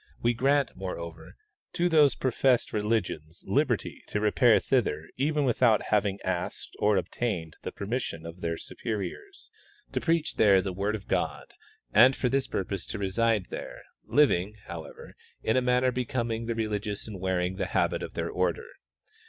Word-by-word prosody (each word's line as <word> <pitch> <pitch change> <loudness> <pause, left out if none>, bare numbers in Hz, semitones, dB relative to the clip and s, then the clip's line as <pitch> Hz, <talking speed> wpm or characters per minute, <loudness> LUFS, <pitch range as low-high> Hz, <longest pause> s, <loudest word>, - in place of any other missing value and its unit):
We 120 +1 +2
grant, 135 +2 +2
moreover, 85 -3 -7 0.4
to 175 - +2
those 155 -5 +5
professed 130 -1 +2
religions 105 -7 -2
liberty - - 0
to 105 - -1
repair 110 +2 +5
thither 105 - +1
even 145 +2 +1
without 120 -3 +3
having 100 -2 +2
asked 90 -2 -3
or 105 -1 +3
obtained 90 -4 -2
the - - -5
permission 100 -6 -4
of 85 +2 -9
their 85 0 -2
superiors; 120 - -6 0.4
to - - -1
preach 165 -2 0
there 100 -3 +6
the 95 0 -3
word 100 +3 -1
of 100 -2 -8
God, - - -2 0.4
and 125 +5 +7
for 125 - 0
this 135 +1 0
purpose 95 -1 -3
to - - -4
reside 100 +1 +1
there, - - -7 0.2
living, 105 -9 +2
however, 85 -2 -9 0.3
in 110 - +2
a 130 - +4
manner 125 +1 +3
becoming 120 -2 -2
the 115 - -1
religious 105 -2 -2
and 105 -4 -7
wearing 95 0 -1
the - - -1
habit - - +1
of - - -6
their - - -2
order. 460 - 0
110 Hz, 160 wpm, -28 LUFS, 95-125 Hz, 0.4 s, and